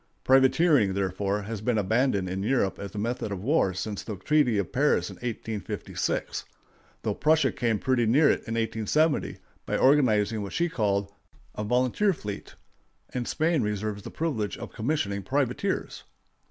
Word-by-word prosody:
Privateering, 130 - +4
therefore, 100 +1 -1
has 105 0 -5
been 115 +1 0
abandoned 105 -1 +1
in 95 +1 -3
Europe 105 -4 0
as 100 +1 -7
a - - -4
method 115 +1 -2
of 95 -1 -4
war 140 -6 +2
since 100 +3 -4
the 110 - -6
treaty 140 - +2
of 100 - -2
Paris 145 +3 +2
in - - -11
1856, 115 -3 -3 0.6
though - - 0
Prussia 155 -2 +3
came 115 -3 0
pretty 120 +1 +1
near 140 +8 +4
it - - +2
in 115 - -2
1870, 115 +7 0 0.3
by - - 0
organizing 115 -6 +3
what 100 - -6
she 170 +1 +1
called 100 -7 -1 0.4
a 105 - -4
volunteer 125 - +2
fleet, 105 - -7 0.6
and 125 -2 -3
Spain 160 -2 +1
reserves 105 -1 -2
the - - -8
privilege 130 -11 -2
of - - -8
commissioning 110 -5 -1
privateers. 130 +4 -1
115 Hz, 155 wpm, -27 LUFS, 100-135 Hz, 0.6 s, Privateering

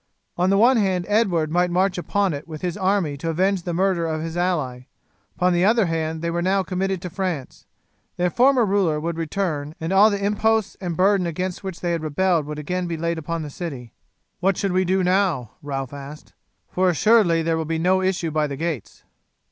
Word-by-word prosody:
On 180 +2 +1
the 195 - +3
one 240 +4 +5
hand 190 -4 +1
Edward 185 -8 +1
might 180 +1 +2
march 185 +2 +1
upon 195 +1 0
it 145 +3 -7
with 155 0 -8
his 175 -2 -2
army 190 -7 0
to 165 +4 -4
avenge 190 +3 +1
the 175 - -4
murder 175 -1 +1
of 160 -1 -2
his 165 0 -5
ally. 150 -9 -1 0.5
Upon 180 0 +2
the 175 +1 +2
other 220 +1 +4
hand 160 -1 -2
they 170 - -1
were 170 +1 -1
now 190 +2 +1
committed 190 0 -2
to 180 - -4
France. 180 -7 -4 0.5
Their 180 0 +1
former 255 +1 +4
ruler 190 -6 +1
would 165 +2 -3
return, 160 -3 -3
and 165 +3 -2
all 205 +3 +7
the 200 - -1
imposts 220 +1 +1
and 175 -3 -3
burdens 190 -1 +3
against 180 +3 -4
which 190 -2 -6
they 175 - -1
had 170 -2 -1
rebelled 160 0 +1
would 150 0 -5
again 180 +4 -3
be 165 -1 -3
laid 170 +1 -2
upon 165 +1 -4
the 150 - -7
city. 135 - -7 0.5
"What 190 0 +1
shall 195 - -1
we 185 +1 +2
do 185 +1 +1
now?" 180 - +1
Ralph 135 -2 -4
asked, 145 +2 -10 0.3
"for 185 0 +1
assuredly 180 -2 +3
there 165 0 +1
will 160 0 -2
be 165 +1 -2
no 185 +3 +2
issue 185 -3 -1
by 155 0 +1
the 140 -1 -5
gates." 160 - -4
175 Hz, 210 wpm, -22 LUFS, 160-190 Hz, 0.5 s, all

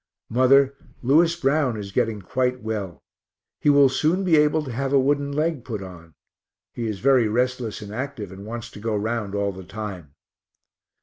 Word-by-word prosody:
Mother, 135 +3 +5 0.3
Lewis 165 +6 +4
Brown 140 -6 +1
is 100 -2 -6
getting 105 0 -1
quite 125 +5 -1
well; 100 -7 -4 0.6
he - - +2
will 140 -1 +7
soon 155 +8 +1
be 175 -4 +4
able 150 +1 +3
to 135 - -6
have 135 +3 -2
a 140 - +5
wooden 140 +1 +1
leg 155 -2 -1
put 110 -5 -5
on. 85 -4 -12 0.6
He 115 -1 -3
is 105 -2 -3
very 130 -2 +4
restless 120 -1 -1
and 105 0 -9
active, 120 -5 -5
and 95 +1 -10
wants 115 +2 -7
to - - -11
go 110 0 -2
round 105 -1 -2
all 100 0 0
the 95 0 -10
time. 90 -7 -7
120 Hz, 180 wpm, -23 LUFS, 105-140 Hz, 0.6 s, will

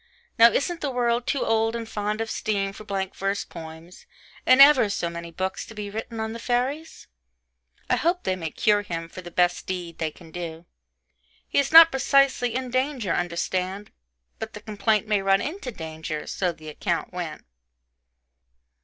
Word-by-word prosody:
Now 230 +1 +9
isn't 345 +4 -1
the 290 - -1
world 240 -1 0
too 280 - 0
old 225 0 +1
and 230 -1 -4
fond 210 0 -2
of 225 - -3
steam, 195 -2 -1
for 215 - -10
blank 195 -2 -3
verse 195 +1 -2
poems, 160 +2 -11 0.4
in 255 +1 +6
ever 275 -6 +8
so 170 -4 -2
many 170 0 -7
books, 190 +3 -3
to 220 - -12
be 205 -1 -5
written 225 +2 -6
on 220 0 -3
the 230 - -7
fairies? 260 +7 -2 0.8
I - - +2
hope 350 +2 0
they 185 - 0
may 165 -3 -4
cure 205 +6 +2
him, 165 -4 -5
for 185 - -9
the 175 - -9
best 175 0 +1
deed 175 -3 -5
they 160 - 0
can 165 +1 -16
do. 170 -1 -6 0.8
He - - +1
is 280 - 0
not 330 +1 +10
precisely 265 -3 +2
in 255 -1 -3
danger, 255 - 0
understand 185 +3 -2 0.5
but - - -6
the - - -9
complaint 215 0 0
may 210 -2 +2
run 195 0 +3
into 295 - -4
danger 160 -4 -6
so 180 -2 -1
the 155 -2 -11
account 150 - -3
went. - - -6
205 Hz, 180 wpm, -25 LUFS, 175-245 Hz, 0.8 s, not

